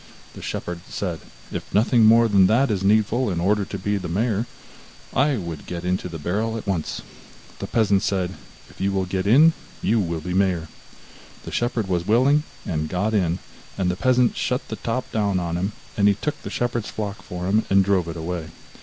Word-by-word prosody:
The -, -, -10 dB
shepherd 85 Hz, -1 st, -4 dB
said: 90 Hz, -5 st, -3 dB, 0.3 s
'If -, -, -6 dB
nothing 115 Hz, +2 st, +5 dB
more 115 Hz, +1 st, +6 dB
than 100 Hz, -3 st, +5 dB
that 120 Hz, +4 st, +3 dB
is 100 Hz, -3 st, 0 dB
needful 110 Hz, +4 st, +3 dB
in 90 Hz, -3 st, -1 dB
order 100 Hz, +4 st, +2 dB
to 100 Hz, -, -5 dB
be 100 Hz, +2 st, -1 dB
mayor, 105 Hz, +5 st, -1 dB, 0.7 s
I 140 Hz, 0 st, +3 dB
would 85 Hz, -6 st, -6 dB
get 85 Hz, 0 st, -5 dB
into 90 Hz, 0 st, -1 dB
the 85 Hz, -, -6 dB
barrel 105 Hz, +8 st, -1 dB
at 110 Hz, -, -7 dB
once.' 95 Hz, -6 st, -2 dB, 0.6 s
The -, -, -4 dB
peasant 100 Hz, -4 st, +2 dB
said: 95 Hz, -2 st, -1 dB, 0.3 s
'If -, -, -13 dB
you 100 Hz, +1 st, +1 dB
will 95 Hz, -1 st, 0 dB
get 95 Hz, +1 st, -2 dB
in, 150 Hz, +9 st, +7 dB, 0.3 s
you 110 Hz, +4 st, +3 dB
will 85 Hz, -4 st, -1 dB
be 90 Hz, +3 st, -4 dB
mayor.' 90 Hz, -4 st, +1 dB, 0.7 s
The -, -, -7 dB
shepherd 120 Hz, -3 st, -1 dB
was 90 Hz, -1 st, -1 dB
willing, 130 Hz, +7 st, +4 dB, 0.2 s
and 80 Hz, -3 st, -2 dB
got 100 Hz, +4 st, 0 dB
in, 90 Hz, -4 st, +2 dB, 0.4 s
and 90 Hz, -2 st, +1 dB
the -, -, -2 dB
peasant 125 Hz, +4 st, +3 dB
shut 125 Hz, +1 st, -2 dB
the 110 Hz, -, -4 dB
top 120 Hz, +2 st, -3 dB
down 100 Hz, -4 st, +1 dB
on 85 Hz, -1 st, -2 dB
him; 95 Hz, +4 st, -1 dB, 0.2 s
then 100 Hz, -1 st, +4 dB
he 100 Hz, -, +4 dB
took 150 Hz, +7 st, -4 dB
the -, -, -6 dB
shepherd's 120 Hz, -2 st, -2 dB
flock 105 Hz, -1 st, -5 dB
for 90 Hz, -1 st, -6 dB
himself, 105 Hz, +4 st, +1 dB
and 95 Hz, 0 st, +5 dB
drove 95 Hz, -3 st, +2 dB
it 85 Hz, 0 st, -5 dB
away. 80 Hz, 0 st, -4 dB
100 Hz, 200 wpm, -23 LUFS, 90-110 Hz, 0.7 s, in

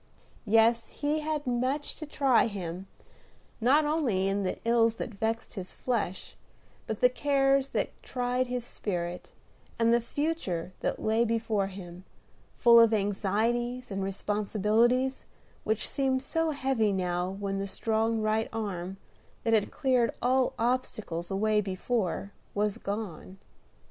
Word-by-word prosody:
Yet 225 Hz, +2 st, +5 dB
he 300 Hz, +1 st, -1 dB
had 305 Hz, -1 st, -2 dB
much 255 Hz, +4 st, -1 dB
to 310 Hz, -, -7 dB
try 270 Hz, -5 st, +3 dB
him, 185 Hz, -3 st, -5 dB, 0.7 s
not 280 Hz, +6 st, +4 dB
only 260 Hz, -12 st, +1 dB
in 195 Hz, +1 st, 0 dB
the 185 Hz, -, -2 dB
ills 230 Hz, -1 st, +3 dB
that 230 Hz, -, -5 dB
vexed 225 Hz, +3 st, -2 dB
his 190 Hz, -4 st, -7 dB
flesh, 220 Hz, -7 st, -3 dB, 0.5 s
but 220 Hz, -, -4 dB
the 250 Hz, -, +8 dB
cares 275 Hz, +1 st, +2 dB
that -, -, -1 dB
tried 250 Hz, 0 st, -1 dB
his 250 Hz, -1 st, -3 dB
spirit, 175 Hz, -6 st, -4 dB, 0.5 s
and 230 Hz, 0 st, +3 dB
the 235 Hz, -, +4 dB
future 230 Hz, -, -2 dB
that -, -, -2 dB
lay 220 Hz, +2 st, +3 dB
before 225 Hz, -3 st, 0 dB
him, 185 Hz, -2 st, -9 dB, 0.5 s
full 235 Hz, -1 st, +7 dB
of 230 Hz, -1 st, +6 dB
anxieties 220 Hz, +5 st, 0 dB
and 195 Hz, 0 st, -2 dB
responsibilities 215 Hz, +6 st, +1 dB, 0.4 s
which 220 Hz, 0 st, 0 dB
seemed 265 Hz, -2 st, 0 dB
so 325 Hz, +3 st, 0 dB
heavy 265 Hz, -7 st, +1 dB
now 180 Hz, -1 st, -1 dB
when 195 Hz, -1 st, -2 dB
the 195 Hz, -, -2 dB
strong 220 Hz, +3 st, 0 dB
right 215 Hz, +1 st, +1 dB
arm, 195 Hz, -4 st, -4 dB, 0.5 s
that 225 Hz, -, +1 dB
had 215 Hz, -2 st, +3 dB
cleared 255 Hz, -4 st, +1 dB
all 255 Hz, +1 st, +2 dB
obstacles 220 Hz, -8 st, -1 dB
away 210 Hz, +2 st, +2 dB
before, 195 Hz, 0 st, -2 dB, 0.2 s
was 205 Hz, 0 st, 0 dB
gone. 195 Hz, -3 st, -5 dB
225 Hz, 135 wpm, -29 LUFS, 195-250 Hz, 0.7 s, the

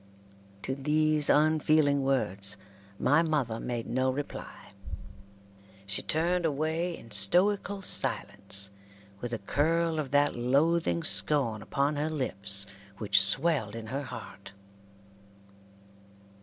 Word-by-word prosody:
To 130 Hz, -, -3 dB
these 150 Hz, +2 st, 0 dB
unfeeling 155 Hz, -1 st, +2 dB
words 105 Hz, -7 st, -2 dB, 0.4 s
my 145 Hz, +9 st, +2 dB
mother 145 Hz, -9 st, -2 dB
made 120 Hz, -2 st, -4 dB
no 130 Hz, +2 st, -1 dB
reply. 140 Hz, +2 st, -7 dB, 1.1 s
She 100 Hz, 0 st, -2 dB
turned 175 Hz, +3 st, 0 dB
away 160 Hz, +3 st, -2 dB
in 115 Hz, -, -15 dB
stoical 195 Hz, -, +3 dB
silence, 100 Hz, -, -1 dB, 0.5 s
with 120 Hz, +2 st, -6 dB
a 115 Hz, -, -2 dB
curl 160 Hz, +9 st, -1 dB
of 145 Hz, -3 st, -4 dB
that 145 Hz, +1 st, +1 dB
loathing 160 Hz, +7 st, 0 dB
scorn 135 Hz, -8 st, 0 dB
upon 140 Hz, +5 st, -2 dB
her 150 Hz, +2 st, -2 dB
lips 100 Hz, -9 st, +4 dB, 0.3 s
which 100 Hz, -2 st, +2 dB
swelled 115 Hz, +1 st, +3 dB
in 115 Hz, -1 st, -7 dB
her 135 Hz, +6 st, -4 dB
heart. 110 Hz, -5 st, -11 dB
140 Hz, 110 wpm, -28 LUFS, 110-155 Hz, 1.1 s, lips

